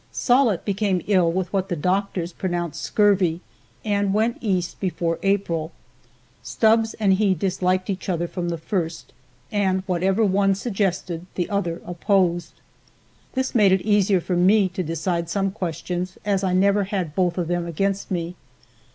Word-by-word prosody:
Sollitt 245 Hz, -7 st, +2 dB
became 195 Hz, -3 st, 0 dB
ill 185 Hz, -5 st, +3 dB
with 185 Hz, +1 st, -3 dB
what 195 Hz, 0 st, 0 dB
the 175 Hz, -, -1 dB
doctors 180 Hz, +1 st, -1 dB
pronounced 175 Hz, -4 st, -3 dB
scurvy, 195 Hz, -5 st, +2 dB, 0.5 s
and 200 Hz, -1 st, +1 dB
went 225 Hz, +2 st, +1 dB
East 185 Hz, -6 st, -1 dB
before 170 Hz, -3 st, -1 dB
April. 175 Hz, -5 st, 0 dB, 0.7 s
Stubbs 225 Hz, 0 st, +2 dB
and 200 Hz, -3 st, +2 dB
he 195 Hz, -1 st, +2 dB
disliked 185 Hz, +1 st, 0 dB
each 190 Hz, 0 st, -4 dB
other 175 Hz, -1 st, 0 dB
from 175 Hz, 0 st, -4 dB
the 170 Hz, -, -2 dB
first, 165 Hz, -1 st, -4 dB, 0.4 s
and 190 Hz, -2 st, +1 dB
whatever 190 Hz, +4 st, +1 dB
one 195 Hz, 0 st, +2 dB
suggested 190 Hz, -5 st, -2 dB
the 175 Hz, -, -1 dB
other 175 Hz, -4 st, -2 dB
opposed. 175 Hz, 0 st, 0 dB, 0.8 s
This 260 Hz, -1 st, -1 dB
made 210 Hz, -6 st, +5 dB
it 190 Hz, 0 st, +3 dB
easier 205 Hz, -3 st, +2 dB
for 180 Hz, -, -2 dB
me 190 Hz, +3 st, +4 dB
to 185 Hz, +1 st, -4 dB
decide 170 Hz, 0 st, -2 dB
some 195 Hz, +1 st, 0 dB
questions, 180 Hz, 0 st, -4 dB
as 200 Hz, -2 st, +1 dB
I 185 Hz, -1 st, +1 dB
never 200 Hz, +2 st, +3 dB
had 185 Hz, -6 st, -3 dB
both 180 Hz, 0 st, 0 dB
of 175 Hz, -2 st, -1 dB
them 175 Hz, 0 st, -1 dB
against 195 Hz, +4 st, -1 dB
me. 175 Hz, -2 st, -2 dB
185 Hz, 155 wpm, -23 LUFS, 175-200 Hz, 0.8 s, made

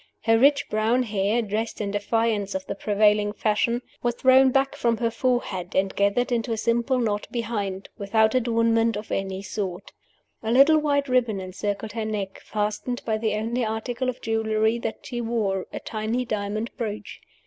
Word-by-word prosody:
Her 225 Hz, -1 st, +4 dB
rich 280 Hz, +2 st, +4 dB
brown 225 Hz, +4 st, +1 dB
hair, 215 Hz, +1 st, 0 dB
dressed 220 Hz, +2 st, -3 dB
in 205 Hz, -2 st, -2 dB
defiance 205 Hz, -1 st, 0 dB
of 190 Hz, 0 st, -3 dB
the -, -, -3 dB
prevailing 210 Hz, 0 st, +2 dB
fashion, 230 Hz, +3 st, 0 dB, 0.2 s
was 240 Hz, -1 st, 0 dB
thrown 260 Hz, +1 st, +6 dB
back 270 Hz, +1 st, +1 dB
from 235 Hz, -1 st, +1 dB
her 230 Hz, 0 st, 0 dB
forehead, 225 Hz, -8 st, -1 dB
and 190 Hz, 0 st, +1 dB
gathered 200 Hz, +6 st, +1 dB
into 235 Hz, -1 st, 0 dB
a 225 Hz, -, 0 dB
simple 235 Hz, +3 st, +1 dB
knot 210 Hz, -4 st, -1 dB
behind 205 Hz, -5 st, -3 dB
without 220 Hz, +2 st, +2 dB
adornment 230 Hz, -2 st, +2 dB
of 210 Hz, -, -8 dB
any 195 Hz, 0 st, -2 dB
sort. 190 Hz, -2 st, -5 dB, 0.5 s
A 225 Hz, -, -2 dB
little 280 Hz, +5 st, +6 dB
white 285 Hz, -2 st, +1 dB
ribbon 245 Hz, -5 st, +1 dB
encircled 200 Hz, +3 st, -4 dB
her 225 Hz, 0 st, -3 dB
neck, 205 Hz, -3 st, -4 dB
fastened 215 Hz, +4 st, -2 dB
by 220 Hz, -1 st, 0 dB
the 215 Hz, -1 st, 0 dB
only 230 Hz, +3 st, -1 dB
article 235 Hz, +3 st, -2 dB
of 250 Hz, -, -5 dB
jewelry 220 Hz, 0 st, +1 dB
that 225 Hz, -1 st, -5 dB
she 240 Hz, -2 st, -4 dB
wore 215 Hz, -5 st, -1 dB
a -, -, -5 dB
tiny 225 Hz, +3 st, -2 dB
diamond 215 Hz, +1 st, -3 dB
brooch. 215 Hz, -3 st, -5 dB
220 Hz, 170 wpm, -25 LUFS, 205-240 Hz, 0.5 s, thrown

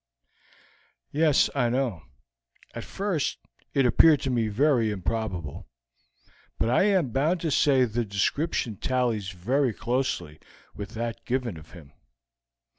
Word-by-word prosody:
"Yes, 150 Hz, -1 st, +3 dB
I 125 Hz, -4 st, +1 dB
know. 120 Hz, -8 st, -1 dB, 0.7 s
At -, -, -6 dB
first 195 Hz, -7 st, -2 dB, 0.4 s
it 135 Hz, -, +3 dB
appeared 150 Hz, +4 st, +6 dB
to 135 Hz, -, -1 dB
me 115 Hz, -3 st, +1 dB
very 120 Hz, +1 st, +2 dB
improbable, 95 Hz, -6 st, -4 dB, 0.9 s
but 115 Hz, -, 0 dB
I 155 Hz, -, +4 dB
am 185 Hz, -, +2 dB
bound 155 Hz, +9 st, +1 dB
to 160 Hz, -, -1 dB
say 135 Hz, -2 st, +4 dB
the 120 Hz, +1 st, -2 dB
description 110 Hz, -, -1 dB
tallies 120 Hz, -6 st, -1 dB
very 120 Hz, +8 st, 0 dB
closely 120 Hz, -, -2 dB, 0.3 s
with 105 Hz, +2 st, -8 dB
that 115 Hz, 0 st, -4 dB
given 125 Hz, -5 st, -2 dB
of 80 Hz, 0 st, -13 dB
him. 75 Hz, -6 st, -14 dB
120 Hz, 125 wpm, -26 LUFS, 105-140 Hz, 0.9 s, appeared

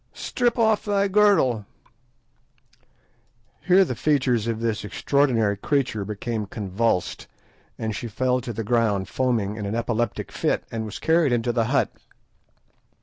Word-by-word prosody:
Strip 245 Hz, -1 st, -1 dB
off 220 Hz, -2 st, +2 dB
the 200 Hz, -1 st, +2 dB
girdle—" 195 Hz, -, +3 dB, 2.0 s
Here 185 Hz, +3 st, +5 dB
the 130 Hz, -, -3 dB
features 125 Hz, -4 st, +1 dB
of 115 Hz, -1 st, -2 dB
this 115 Hz, -3 st, -1 dB
extraordinary 115 Hz, -2 st, +1 dB
creature 120 Hz, -1 st, -1 dB
became 105 Hz, +1 st, -4 dB
convulsed, 100 Hz, -1 st, -2 dB, 0.5 s
and 110 Hz, -1 st, -3 dB
she 120 Hz, -, -5 dB
fell 125 Hz, +3 st, 0 dB
to 120 Hz, -, -5 dB
the 115 Hz, 0 st, -4 dB
ground 105 Hz, -4 st, +1 dB
foaming 115 Hz, -5 st, 0 dB
in 105 Hz, -2 st, -4 dB
an 105 Hz, -, -2 dB
epileptic 115 Hz, -1 st, -2 dB
fit, -, -, -1 dB
and 115 Hz, -1 st, -3 dB
was 110 Hz, -, -6 dB
carried 160 Hz, -3 st, +2 dB
into 120 Hz, 0 st, +1 dB
the 115 Hz, -1 st, +1 dB
hut. 135 Hz, +5 st, +1 dB
115 Hz, 140 wpm, -24 LUFS, 110-140 Hz, 2.0 s, Here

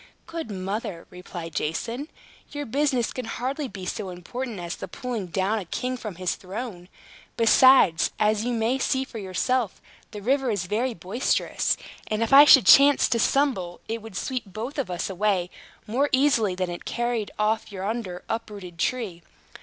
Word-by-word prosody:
"Good 330 Hz, -6 st, -6 dB
mother," 195 Hz, -1 st, -4 dB
replied 175 Hz, -2 st, -8 dB
Jason, 230 Hz, -, -3 dB, 0.4 s
"your 290 Hz, 0 st, -5 dB
business 265 Hz, -1 st, 0 dB
can 255 Hz, -, -5 dB
hardly 265 Hz, +5 st, -3 dB
be 195 Hz, -6 st, -8 dB
so 195 Hz, +1 st, -4 dB
important 210 Hz, +5 st, -6 dB
as 175 Hz, 0 st, -4 dB
the -, -, -7 dB
pulling 230 Hz, 0 st, -4 dB
down 195 Hz, +5 st, 0 dB
a 195 Hz, -, -7 dB
king 250 Hz, +9 st, -3 dB
from 215 Hz, -6 st, -7 dB
his 185 Hz, 0 st, -1 dB
throne. 190 Hz, -2 st, -7 dB, 0.5 s
Besides, 230 Hz, -7 st, +6 dB
as 210 Hz, 0 st, +2 dB
you 245 Hz, -, -1 dB
may 235 Hz, +3 st, 0 dB
see 265 Hz, 0 st, +1 dB
for 235 Hz, -4 st, -8 dB
yourself, 205 Hz, +4 st, -1 dB, 0.3 s
the 210 Hz, -, -8 dB
river 270 Hz, +2 st, +1 dB
is 200 Hz, -5 st, -1 dB
very 230 Hz, +6 st, -1 dB
boisterous; 200 Hz, +9 st, 0 dB, 0.3 s
and 215 Hz, +1 st, 0 dB
if 230 Hz, -, -1 dB
I 285 Hz, +2 st, +11 dB
should 270 Hz, -4 st, +8 dB
chance 280 Hz, 0 st, +7 dB
to 230 Hz, -, +1 dB
stumble, 225 Hz, -10 st, +1 dB
it 225 Hz, 0 st, -3 dB
would 220 Hz, -3 st, -8 dB
sweep 255 Hz, -3 st, -3 dB
both 225 Hz, +9 st, -5 dB
of 265 Hz, -, -2 dB
us 180 Hz, 0 st, -2 dB
away 190 Hz, -2 st, 0 dB, 0.3 s
more 260 Hz, +7 st, +1 dB
easily 260 Hz, -8 st, +3 dB
than 185 Hz, -1 st, -2 dB
it 175 Hz, -, -6 dB
has -, -, -5 dB
carried 240 Hz, -3 st, -1 dB
off 215 Hz, +1 st, 0 dB
yonder 195 Hz, -1 st, -4 dB
uprooted 200 Hz, -6 st, -6 dB
tree. 205 Hz, -6 st, -2 dB
220 Hz, 170 wpm, -25 LUFS, 185-255 Hz, 0.5 s, I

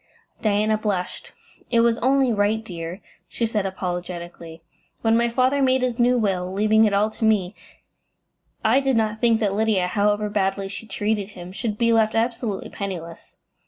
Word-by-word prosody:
Diana 215 Hz, 0 st, +1 dB
blushed. 195 Hz, -4 st, -3 dB, 0.4 s
"It 235 Hz, -1 st, +3 dB
was 235 Hz, 0 st, +2 dB
only 265 Hz, -1 st, +2 dB
right, 215 Hz, +2 st, 0 dB
dear," 170 Hz, 0 st, -7 dB, 0.3 s
she 235 Hz, -, -1 dB
said, 215 Hz, -3 st, -1 dB
apologetically. 175 Hz, -3 st, -6 dB, 0.4 s
"When 225 Hz, 0 st, +3 dB
my 235 Hz, +1 st, +2 dB
father 255 Hz, +4 st, +2 dB
made 260 Hz, -1 st, +2 dB
his 250 Hz, -1 st, -1 dB
new 245 Hz, +1 st, +4 dB
will, 185 Hz, -5 st, -1 dB
leaving 215 Hz, +3 st, +3 dB
it 210 Hz, -, +1 dB
all 210 Hz, +2 st, +2 dB
to 225 Hz, -, -7 dB
me, 210 Hz, -4 st, +2 dB, 1.1 s
I 230 Hz, +5 st, +5 dB
did 270 Hz, -3 st, +1 dB
not 220 Hz, -1 st, -1 dB
think 230 Hz, -2 st, +3 dB
that 205 Hz, -2 st, +1 dB
Lydia, 210 Hz, -3 st, +1 dB
however 205 Hz, +3 st, +1 dB
badly 195 Hz, -1 st, -1 dB
she 215 Hz, +3 st, -8 dB
treated 205 Hz, 0 st, -2 dB
him, 175 Hz, 0 st, -8 dB
should 210 Hz, +2 st, -4 dB
be 230 Hz, 0 st, +2 dB
left 220 Hz, -1 st, +2 dB
absolutely 230 Hz, -3 st, -2 dB
penniless. 170 Hz, -5 st, -7 dB
215 Hz, 165 wpm, -23 LUFS, 195-230 Hz, 1.1 s, I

